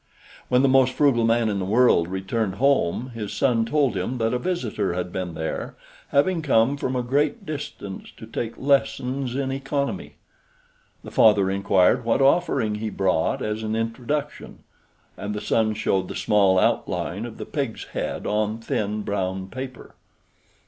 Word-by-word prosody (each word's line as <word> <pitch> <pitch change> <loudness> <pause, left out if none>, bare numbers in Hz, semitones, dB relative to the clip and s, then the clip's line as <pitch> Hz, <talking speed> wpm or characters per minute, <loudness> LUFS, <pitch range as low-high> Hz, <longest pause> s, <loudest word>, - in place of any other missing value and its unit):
When 125 +1 +4
the - - +5
most 130 -1 +4
frugal 130 -6 +3
man 115 0 +2
in 100 -2 -1
the - - -2
world 105 -4 +4
returned 95 +2 -2
home, 130 -2 +1
his 105 -3 -5
son 115 -4 +1
told 140 +1 +1
him 130 - -2
that 115 0 0
a 125 - 0
visitor 120 - -2
had 90 0 -3
been 90 -4 -4
there, 80 0 -4 0.3
having 165 +5 +2
come 135 -3 +3
from 130 -2 -3
a 125 - 0
great 140 +4 0
distance 140 -10 -6
to - - -9
take 115 +1 -5
lessons 135 -2 0
in 135 -1 -1
economy. 140 +7 -3 0.9
The - - -9
father 100 -3 +5
inquired 100 +4 +3
what 115 0 +1
offering 135 -6 +2
he 110 +1 -3
brought 95 -5 0
as 105 +1 -2
an 110 0 -2
introduction, 125 +6 -3 0.5
and 105 +1 -4
the - - -2
son 110 0 +1
showed 95 -3 0
the - - -7
small 100 -3 +3
outline 95 +1 0
of 120 -2 -7
the - - -6
pig's 135 -7 -3
head - - -3
on 105 +1 0
thin 105 -2 -2
brown 95 -1 -2
paper. 130 +2 -8
115 Hz, 165 wpm, -24 LUFS, 100-135 Hz, 0.9 s, the